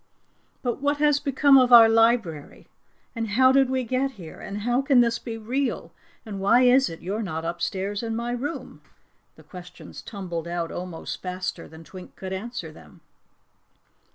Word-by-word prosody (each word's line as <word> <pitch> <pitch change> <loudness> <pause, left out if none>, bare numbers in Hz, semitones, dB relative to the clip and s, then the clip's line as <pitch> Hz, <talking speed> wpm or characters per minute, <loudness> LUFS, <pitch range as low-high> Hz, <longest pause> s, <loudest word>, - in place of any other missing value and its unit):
"But 245 +1 -2
what 285 +1 +1
has 295 -1 +3
become 280 -1 +4
of 255 -1 +3
our 230 -2 +10
library, 225 -9 +1 0.5
and 230 -1 -3
how 260 +5 +4
did 270 -1 +3
we 260 -1 -1
get 260 +3 -1
here, 175 -7 -11
and 200 +1 -6
how 245 +4 +1
can 270 -2 +4
this 235 -1 +1
be 225 -1 -6
real, 250 +5 -3 0.3
and 205 -3 -6
why 230 +6 +4
is 255 +2 +4
it 165 - -10
you're 200 +5 -3
not 165 -6 -4
upstairs 190 +4 -3
in 225 -1 -3
my 235 +1 -3
room?" 275 +6 -5 0.5
The - - -17
questions 180 -1 -11
tumbled 175 -5 -6
out 170 -1 -3
almost 180 -2 -6
faster 185 0 -5
than 160 +1 -13
Twink 185 +2 -12
could 190 0 -6
ask 235 +6 -5
them. 155 - -14
225 Hz, 170 wpm, -24 LUFS, 180-255 Hz, 0.5 s, our